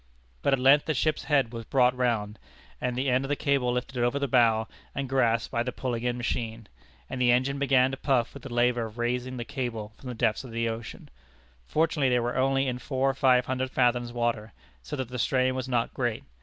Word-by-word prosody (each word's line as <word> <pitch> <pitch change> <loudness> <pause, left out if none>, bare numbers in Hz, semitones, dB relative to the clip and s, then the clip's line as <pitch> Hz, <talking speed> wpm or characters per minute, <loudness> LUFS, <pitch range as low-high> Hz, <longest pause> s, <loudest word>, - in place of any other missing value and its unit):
But 140 - +2
at - - +4
length 135 +3 +5
the 155 - -1
ship's 155 +4 0
head 135 -6 +2
was 115 -1 -5
brought 125 0 +3
round, 115 -4 -1 0.4
and 125 -1 -1
the 130 +2 -1
end 130 +1 +2
of 135 - -5
the 145 - +1
cable 140 -4 +1
lifted 125 +1 -3
over 120 +3 +1
the 140 0 -1
bow, 115 -3 +3 0.3
and 140 0 -2
grasped 120 -3 +1
by 115 - 0
the 125 +1 -2
pulling 120 -3 -3
in 125 0 -1
machine, 115 -2 -3 0.4
and 130 - -4
the 120 -1 +5
engine 130 +3 +1
began 135 -2 +3
to 135 - -4
puff 130 -4 +1
with 140 - -10
the 135 - -9
labor 120 -1 +1
of 110 +1 -14
raising 125 +2 -2
the 120 - -4
cable 115 -6 -4
from 130 - -8
the 125 - -5
depths 115 -1 0
of 130 - -9
the 115 0 -1
ocean. 115 0 -6 0.6
Fortunately 155 -4 +1
they 125 -1 +3
were 120 +1 -2
only 135 +1 +2
in 125 -1 -2
four 135 +1 0
or - - -8
five 130 -2 +3
hundred 130 0 -2
fathoms 120 -2 +1
water, 115 -3 -2 0.3
so 65 - -6
that 130 -4 -4
the 125 0 -5
strain 130 +2 +2
was 130 0 -4
not 120 -2 0
great. 120 -4 -2
125 Hz, 230 wpm, -27 LUFS, 120-130 Hz, 0.6 s, length